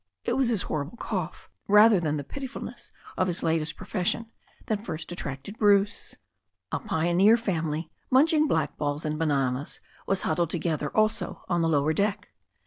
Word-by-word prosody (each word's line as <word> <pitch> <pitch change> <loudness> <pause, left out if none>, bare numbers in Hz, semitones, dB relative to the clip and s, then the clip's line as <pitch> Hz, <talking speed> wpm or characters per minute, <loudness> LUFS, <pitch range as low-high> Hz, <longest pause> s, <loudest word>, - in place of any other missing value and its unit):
It - - 0
was 265 -3 +2
his 220 -6 +1
horrible 150 +9 -4
cough, 185 -7 -4 0.2
rather 210 0 +7
than 155 -3 -1
the 145 - -4
piti 270 - -6
fulness 260 - -9 0.3
of 185 - +2
his 175 -1 -2
latest 160 -1 0
profession, 220 +4 -2 0.3
th?it 210 -2 -2
first 165 -5 -6
attracted 160 +5 -6
Bruce. 205 0 +2 0.6
A - - -1
pioneer 190 +2 +3
family, 165 -7 -2 0.2
munching 305 +3 +4
blackballs 150 - -1
and 155 0 -2
bananas, 140 -3 0 0.3
was 195 - +1
huddled 165 0 +1
together, 160 -3 -1
also 215 -3 +1
on 175 -2 +1
the 165 - +2
lower 150 0 +2
deck. 200 +4 -1
175 Hz, 155 wpm, -27 LUFS, 155-215 Hz, 0.6 s, rather